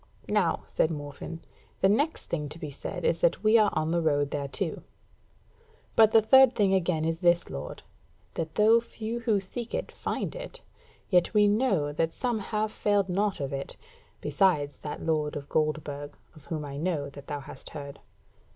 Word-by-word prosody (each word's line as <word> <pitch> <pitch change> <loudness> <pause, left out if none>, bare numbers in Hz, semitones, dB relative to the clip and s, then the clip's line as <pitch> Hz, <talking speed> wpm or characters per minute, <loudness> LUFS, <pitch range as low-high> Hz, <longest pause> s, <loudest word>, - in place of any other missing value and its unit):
"Now," 205 -5 +1
said 155 - +1
Morfinn, 150 +2 -6 0.4
"the 190 - +6
next 285 +11 +1
thing 150 -3 -3
to 155 - -8
be 155 -3 -6
said 140 - -6
is 485 - +1
that - - +2
we 215 +1 +6
are 210 -1 +5
on 155 +1 0
the 170 0 +1
road 145 -3 +1
thereto: 145 +5 -3 1.1
but 220 -1 +6
the 220 -1 +6
third 265 +3 +7
thing 200 -2 +3
again 175 -4 +1
is 165 0 -1
this, 175 -1 +2
lord, - - -7 0.5
that 160 -1 -4
though 220 +2 +6
few 230 0 -5
who 225 -4 +1
seek 225 +5 -5
it - - -3
find - - -4
it, - - -8 0.5
yet 180 +3 +3
we 210 0 +6
know 205 - +1
that 165 +2 0
some 245 -4 -1
have 215 +1 -2
failed 205 -3 +1
not 200 +2 0
of 140 -1 -3
it, 135 0 -5 0.4
besides 150 -7 +1
that 150 - -6
lord 155 -2 0
of 145 -1 -6
Goldburg, 150 -2 -2 0.2
of 150 -3 -16
whom 155 -1 -3
I 140 -1 -6
know 155 -3 -1
that 140 0 -12
thou 145 -1 -4
hast 135 - -11
heard. 140 -2 -8
170 Hz, 180 wpm, -28 LUFS, 150-215 Hz, 1.1 s, third